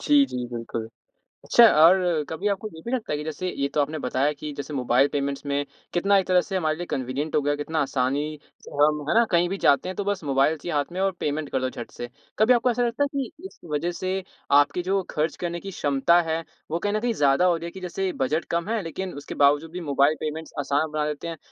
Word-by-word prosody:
जी, 290 Hz, -1 st, +6 dB
जी, 125 Hz, -, -4 dB
बिल्कुल। 115 Hz, -1 st, -5 dB, 0.6 s
अच्छा 235 Hz, -, +7 dB, 0.2 s
और 175 Hz, -3 st, +4 dB
कभी 175 Hz, +6 st, -2 dB
आपको 200 Hz, +1 st, -1 dB
ये 160 Hz, -, -10 dB
भी 235 Hz, -, -4 dB
लगता 245 Hz, -10 st, -2 dB
है 150 Hz, -, 0 dB
कि 150 Hz, -, -5 dB
जैसे 160 Hz, +4 st, -4 dB
ये 140 Hz, 0 st, +1 dB
तो 150 Hz, -, +3 dB
आपने 155 Hz, +2 st, -2 dB
बताया 135 Hz, +3 st, +1 dB
कि 150 Hz, +1 st, -7 dB
जैसे 145 Hz, +1 st, -6 dB
मोबाइल 130 Hz, +1 st, +3 dB
पेमेंट्स 140 Hz, 0 st, -2 dB
में 140 Hz, 0 st, -1 dB, 0.3 s
कितना 195 Hz, +3 st, +3 dB
एक 190 Hz, -, +1 dB
तरह 180 Hz, -1 st, +4 dB
से 195 Hz, -, -3 dB
हमारे 155 Hz, -4 st, 0 dB
लिए 175 Hz, -, -4 dB
कन्वीनियंट 135 Hz, +4 st, -2 dB
हो 150 Hz, -, +3 dB
गया, 145 Hz, +1 st, +1 dB
कितना 155 Hz, +2 st, -3 dB
आसानी 140 Hz, +3 st, -1 dB, 0.2 s
से -, -, -13 dB
हम, 150 Hz, 0 st, +3 dB
है -, -, +3 dB
ना? 235 Hz, -, +6 dB
कहीं 175 Hz, 0 st, +3 dB
भी 195 Hz, -, -2 dB
जाते 145 Hz, +6 st, +4 dB
हैं, 185 Hz, -, -5 dB
तो 205 Hz, -, -2 dB
बस 200 Hz, -4 st, -2 dB
मोबाइल 140 Hz, +3 st, +2 dB
चाहिए 165 Hz, +2 st, -5 dB
हाथ 145 Hz, +3 st, -1 dB
में 185 Hz, -, -5 dB
और 195 Hz, 0 st, +2 dB
पेमेंट 150 Hz, 0 st, -2 dB
कर 130 Hz, -, 0 dB
दो 130 Hz, -, 0 dB
झट 120 Hz, -2 st, -8 dB
से। 120 Hz, -, -7 dB, 0.3 s
कभी 230 Hz, +4 st, +6 dB
आपको 245 Hz, +1 st, +3 dB
ऐसा 245 Hz, +1 st, 0 dB
लगता 235 Hz, +4 st, 0 dB
है -, -, +2 dB
कि 270 Hz, -, -2 dB, 0.2 s
इस -, -, -21 dB
वजह 160 Hz, +4 st, 0 dB
से 185 Hz, 0 st, -1 dB, 0.5 s
आपकी 145 Hz, +5 st, +1 dB
जो 195 Hz, 0 st, +2 dB
खर्च 155 Hz, +2 st, -1 dB
करने 170 Hz, 0 st, -2 dB
की 195 Hz, +1 st, -7 dB
क्षमता 145 Hz, +3 st, +3 dB
है, 165 Hz, 0 st, -2 dB, 0.3 s
वो 165 Hz, -, 0 dB
कहीं 205 Hz, +2 st, -1 dB
न 215 Hz, -, +1 dB
कहीं 240 Hz, +1 st, 0 dB
ज़्यादा 145 Hz, 0 st, +3 dB
हो 175 Hz, -2 st, +4 dB
रही 165 Hz, -, -7 dB
है 170 Hz, -, -5 dB
कि 190 Hz, -, -9 dB
जैसे 190 Hz, +1 st, -2 dB
बजट 155 Hz, +5 st, 0 dB
कम 170 Hz, +2 st, -1 dB
है, 225 Hz, -2 st, 0 dB
लेकिन 185 Hz, +3 st, -5 dB
उसके -, -, -7 dB
बावजूद 145 Hz, +3 st, +3 dB
भी 180 Hz, -, -5 dB
मोबाइल 140 Hz, +3 st, +4 dB
पेमेंट्स 155 Hz, +1 st, -5 dB
आसान 145 Hz, +2 st, 0 dB
बना 150 Hz, -1 st, -1 dB
देते 150 Hz, +2 st, -4 dB
हैं, 165 Hz, -1 st, -5 dB
160 Hz, 255 wpm, -25 LUFS, 145-185 Hz, 0.6 s, अच्छा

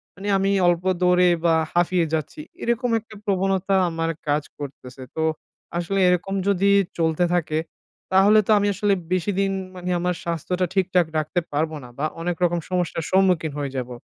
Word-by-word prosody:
মানে 195 Hz, +2 st, -7 dB
আমি 195 Hz, +1 st, +1 dB, 0.2 s
অল্প 175 Hz, 0 st, +2 dB, 0.2 s
দৌড়েই 180 Hz, 0 st, +4 dB
বা 165 Hz, -1 st, +4 dB, 0.2 s
হাঁফিয়ে 175 Hz, 0 st, +2 dB
যাচ্ছি। 160 Hz, -, -3 dB, 0.2 s
এরকম 235 Hz, +1 st, 0 dB
একটা 215 Hz, 0 st, -15 dB
প্রবণতা 195 Hz, 0 st, +1 dB
আমার 165 Hz, 0 st, -2 dB, 0.2 s
কাজ 145 Hz, 0 st, +1 dB, 0.2 s
করতেছে। 135 Hz, -2 st, -9 dB
তো 160 Hz, -, -1 dB, 0.5 s
আসলে 185 Hz, +3 st, -1 dB
এরকম 180 Hz, +2 st, +1 dB
যদি 200 Hz, 0 st, +3 dB, 0.3 s
চলতে 160 Hz, +1 st, +1 dB
থাকে 155 Hz, -2 st, 0 dB, 0.5 s
তাহলে 200 Hz, +3 st, +6 dB
তো -, -, +3 dB
আমি 205 Hz, -, +1 dB
আসলে 200 Hz, +1 st, +1 dB, 0.2 s
বেশিদিন 195 Hz, +2 st, 0 dB, 0.2 s
মানে 180 Hz, 0 st, -5 dB
আমার 180 Hz, 0 st, 0 dB
স্বাস্থ্যটা 175 Hz, +2 st, -1 dB
ঠিকঠাক 185 Hz, -3 st, +2 dB
রাখতে 155 Hz, +4 st, 0 dB
পারব 155 Hz, +2 st, 0 dB
না। 125 Hz, -, -10 dB
বা 155 Hz, -, 0 dB, 0.2 s
অনেক 175 Hz, 0 st, -1 dB
রকম 175 Hz, 0 st, +2 dB
সমস্যার 175 Hz, -3 st, -1 dB
সম্মুখীন 180 Hz, -5 st, +3 dB
হয়ে 140 Hz, -2 st, -3 dB
যাবো। 125 Hz, -1 st, -4 dB
180 Hz, 160 wpm, -23 LUFS, 160-195 Hz, 0.5 s, তাহলে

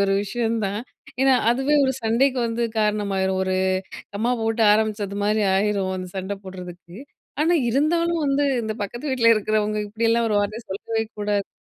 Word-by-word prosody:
ஒரு 195 Hz, -, +1 dB
விஷயம் 225 Hz, +3 st, -1 dB
தான் 200 Hz, +2 st, -2 dB, 0.4 s
ஏன்னா, 270 Hz, 0 st, +5 dB, 0.2 s
அதுவே 270 Hz, +5 st, +1 dB
ஒரு 265 Hz, -, +1 dB
சண்டைக்கு 250 Hz, +4 st, +2 dB
வந்து 230 Hz, +1 st, -2 dB
காரணமாயிரும். 200 Hz, -3 st, 0 dB
ஒரு 190 Hz, 0 st, -1 dB, 0.6 s
கமா 230 Hz, +4 st, 0 dB
போட்டு 225 Hz, 0 st, 0 dB
ஆரம்பிச்சதுமாரி 210 Hz, -1 st, 0 dB
ஆயிரும். 195 Hz, -1 st, 0 dB
அந்த 185 Hz, 0 st, -6 dB
சண்ட 190 Hz, +1 st, -3 dB
போடுறதுக்கு. 180 Hz, -2 st, -10 dB, 0.4 s
ஆனா 330 Hz, +3 st, +3 dB, 0.2 s
இருந்தாலும் 335 Hz, +6 st, +1 dB
வந்து 280 Hz, +1 st, +2 dB, 0.2 s
இந்த 220 Hz, -, -2 dB
பக்கத்து 240 Hz, +8 st, -5 dB
வீட்டில 230 Hz, -3 st, +4 dB
இருக்கிறவங்க 215 Hz, 0 st, 0 dB
இப்படியெல்லாம் 230 Hz, +2 st, +1 dB
ஒரு 205 Hz, -, +2 dB
வார்த்தைய 215 Hz, +3 st, -3 dB
சொல்லவே 220 Hz, +3 st, -2 dB, 0.2 s
கூடாது 205 Hz, -1 st, -1 dB
215 Hz, 150 wpm, -23 LUFS, 200-240 Hz, 0.6 s, ஏன்னா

